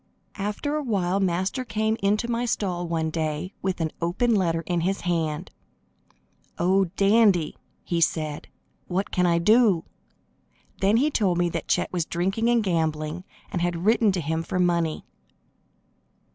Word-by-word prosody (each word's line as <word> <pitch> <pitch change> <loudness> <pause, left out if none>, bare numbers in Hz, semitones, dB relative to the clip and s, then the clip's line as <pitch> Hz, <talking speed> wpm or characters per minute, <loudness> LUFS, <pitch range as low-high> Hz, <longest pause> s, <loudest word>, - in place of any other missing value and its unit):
After 210 +9 -2
a - - -1
while 195 -7 0
Master 190 +6 0
came 220 -1 0
into 210 +4 +1
my 240 0 -1
stall 180 -6 -2
one 160 -1 -1
day, 155 +3 -3
with 190 -1 -2
an 160 -2 -1
open 195 +8 +1
letter 170 -5 +1
in 175 -2 0
his 190 +3 -1
hand. 165 -4 -2 1.1
"Oh, 190 +3 +3
Dandy!" 200 -5 +3 0.3
he 170 -1 -1
said, 155 -2 -1 0.4
"what 190 +2 -2
can 180 -1 +2
I 170 -1 +3
do?" 210 -1 +4 1.0
Then 200 +3 +3
he 295 +5 +2
told 190 -9 +1
me 175 0 +2
that 165 -1 -4
Chet - - 0
was 175 -3 0
drinking 195 +7 0
and 240 -2 +3
gambling, 160 -1 -1 0.3
and 180 - -2
had 175 0 -1
written 220 -1 +4
to 180 - -1
him 160 +2 -1
for 165 - -4
money. 170 -3 +1
180 Hz, 155 wpm, -25 LUFS, 170-210 Hz, 1.1 s, do